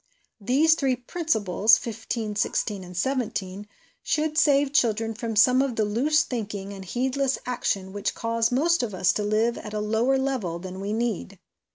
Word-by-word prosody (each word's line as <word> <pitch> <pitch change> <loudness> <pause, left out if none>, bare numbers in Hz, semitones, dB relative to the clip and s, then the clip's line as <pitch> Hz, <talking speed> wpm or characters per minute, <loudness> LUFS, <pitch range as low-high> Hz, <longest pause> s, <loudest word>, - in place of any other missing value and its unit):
These 275 +10 +3
three 270 -5 +1
principles 225 - +2
(15, 225 -1 -4
16 205 -1 -1
and 180 -1 -10
17) 210 -4 -2 0.3
should 310 -1 -1
save 285 -3 +3
children 225 -4 +1
from 225 0 -4
some 250 +5 +5
of 270 -3 -1
the 220 - +1
loose 280 +10 +2
thinking 205 -4 -5
and 195 -1 -8
heed 250 +8 -2
less 275 -1 +1
action 195 -6 -2
which 205 0 -2
cause 230 0 0
most 325 +6 +2
of 220 -5 -3
us 185 -1 +2
to 210 - -2
live 220 +3 +1
at 210 -1 -8
a - - -1
lower 225 +5 +1
level 260 -11 -2
than 185 +1 -8
we 200 +1 -4
need. 220 -4 -2
225 Hz, 175 wpm, -25 LUFS, 205-265 Hz, 0.3 s, some